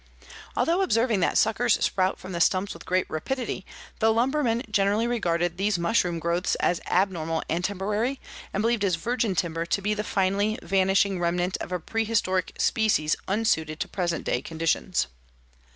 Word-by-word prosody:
Although 340 +4 +2
observing 230 - +2
that 180 - +2
suckers 220 -2 +3
sprout 185 0 +1
from 190 - -9
the 170 -1 -2
stumps 185 +3 +2
with 170 - -13
great 185 0 +1
rapidity, 225 +4 -4 0.3
the 225 0 +4
lumberman 240 0 +1
generally 205 +2 +2
regarded 175 -7 0
these 200 0 +1
mushroom 175 -1 +1
growths 170 +2 0
as 175 - 0
abnormal 170 -4 0
and 170 +2 -1
temporary, 210 +7 -1 0.3
and 200 - -1
believed 230 -1 +1
his 195 -4 +2
virgin 230 +2 -1
timber 165 -1 -1
to 200 - +1
be 205 +2 0
the 210 0 -2
finally 200 +2 +1
vanishing 195 0 +2
remnant 175 +1 0
of - - -7
a 180 - -1
prehistoric 205 -2 -1
species 200 -9 +2
unsuited 165 -7 0
to - - -2
present 175 -3 -2
day 125 - 0
conditions. 165 +4 0
195 Hz, 160 wpm, -26 LUFS, 175-220 Hz, 0.3 s, the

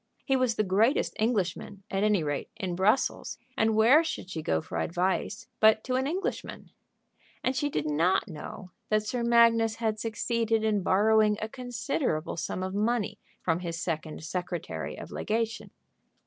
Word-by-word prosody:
He 270 - +2
was 255 -3 +2
the 215 - +1
greatest 210 +7 +2
Englishman, 200 -3 -1
at 195 +1 0
any 210 -5 +3
rate, 145 -1 -3
in 190 -5 -3
Brussels, 210 +8 +1 0.2
and 220 0 +2
where 245 +9 +6
should 255 - -5
she 160 - -3
go 80 - +1
for 80 - -5
advice 185 - -1
but 220 0 +5
to 255 - -3
an 260 +1 +1
Englishman? 365 +6 -4 0.7
And 255 - +1
she 290 +2 0
did 150 - -2
not 180 +8 +2
know 180 +2 -8 0.2
that 215 0 +2
Sir 245 +3 -2
Magnus 230 -1 +4
had 220 -2 -1
succeeded 225 0 0
in 215 -2 +2
borrowing 210 +3 +4
a 220 - -3
considerable 245 - -2
sum 185 +2 -3
of 185 0 -3
money 215 +1 0 0.2
from 165 -1 +1
his 170 -2 -4
second 155 -3 -4
secretary 175 - -4
of - - -9
legation. 225 0 -2
215 Hz, 160 wpm, -28 LUFS, 180-230 Hz, 0.7 s, where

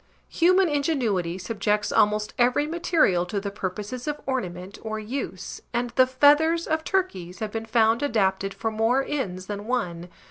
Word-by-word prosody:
Human 365 +2 +4
ingenuity 245 - 0
subjects 210 +2 -1
almost 210 0 +2
every 250 +4 +3
material 320 - +2
to 200 +3 -2
the 200 0 -5
purposes 210 +6 -5
of 295 0 -2
ornament 190 -7 -4
or 220 -1 -4
use 215 -5 -5
and 240 0 -1
the 255 +2 +4
feathers 295 +5 +4
of 315 0 -1
turkeys 190 - -2
have 215 -1 -4
been 225 0 -5
found 225 0 +3
adapted 195 -7 +1
for 200 +3 -3
more 230 +5 +1
ends 190 -11 -3
than 205 +1 -6
one. 180 -9 -2
225 Hz, 155 wpm, -25 LUFS, 195-280 Hz, -, Human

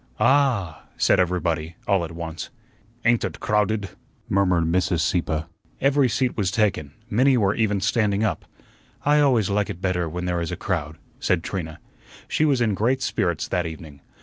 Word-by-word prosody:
"Ah!" 120 - +2
said - - +3
everybody 85 -3 0
all 100 -3 +2
at 85 - -5
once. 85 -1 -6 0.6
"Ain't 115 0 +3
ut - - -4
crowdut?" 105 -2 0 0.3
murmured 90 -3 +2
Mr. 90 +1 +1
Sieppe. 80 -2 0 0.4
Every 140 -1 +3
seat 125 +1 0
was 100 -4 0
taken; 95 -9 0
many 130 +4 +3
were 100 -3 +2
even 105 -3 +1
standing 105 0 +1
up. 110 - -1 0.6
"I 150 +1 +4
always 125 -9 +3
like 105 0 0
it 85 - -5
better 90 -3 -1
when 90 +3 -4
there 90 -1 -1
is 85 - -3
a 90 - -4
crowd," 80 -4 -3 0.2
said 90 -3 +1
Trina. 80 -6 -5 0.5
She 155 - +1
was 140 -5 +2
in 110 -3 +2
great 125 +7 +1
spirits 85 - -1
that 90 -2 0
evening. 80 -3 -10
95 Hz, 170 wpm, -23 LUFS, 85-110 Hz, 0.6 s, I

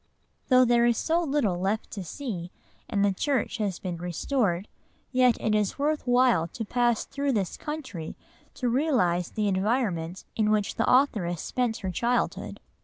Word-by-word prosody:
'" - - -44
Though 255 -1 +6
there 240 0 +4
is 235 -2 +2
so 330 +2 +1
little 275 - 0
left 200 +4 -1
to 200 - -5
see, 180 - -5 0.4
and 200 -1 +2
the 200 - +2
church 260 +3 -1
has 200 -4 -1
been 180 -3 -5
"restored," 180 - -1 0.4
yet 255 -3 +4
it 215 - 0
is 210 -2 +1
worth 295 -1 -1
while 245 -9 +4
to 225 +6 -6
pass 240 0 +1
through 280 -1 -1
this 195 -6 -1
country 260 - -6 0.4
to 250 - -2
realise 235 - +1
the 215 -2 -1
environment 190 -4 -1
in 215 -1 +2
which 210 -1 +1
the 225 - +1
authoress 205 - +2
spent 245 -3 -1
her 185 - -1
childhood. 240 +7 -1
220 Hz, 170 wpm, -27 LUFS, 185-255 Hz, 0.4 s, Though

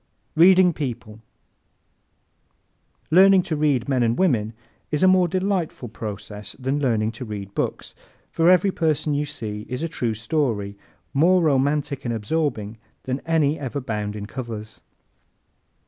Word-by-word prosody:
Reading 180 +2 +6
People 120 -7 -5
¶ - - -19 1.9
Learning 190 +2 +6
to 160 - -2
read 145 -5 +1
men 130 -3 +1
and 115 0 +1
women 115 - +1 0.4
is 150 +2 0
a - - +7
more 185 -1 +5
delightful 185 - -2
process 105 -1 -7
than 135 +2 -1
learning 115 -5 +1
to 115 +2 -8
read 100 -3 -7
books, - - -3 0.4
for 165 +1 +3
every 185 +2 +4
person 155 -3 0
you 145 +1 -1
see 110 -7 -6
is 125 +4 -4
a - - 0
true 120 -8 -2
story, 110 -4 -1 0.4
more 175 +5 +4
romantic 140 -1 +1
and 120 -2 -2
absorbing 110 -3 -2 0.2
than 130 +1 -2
any 160 -2 +2
ever 140 0 -4
bound 105 -5 -4
in 105 -1 -5
covers. 110 -2 -7
135 Hz, 145 wpm, -23 LUFS, 110-160 Hz, 1.9 s, a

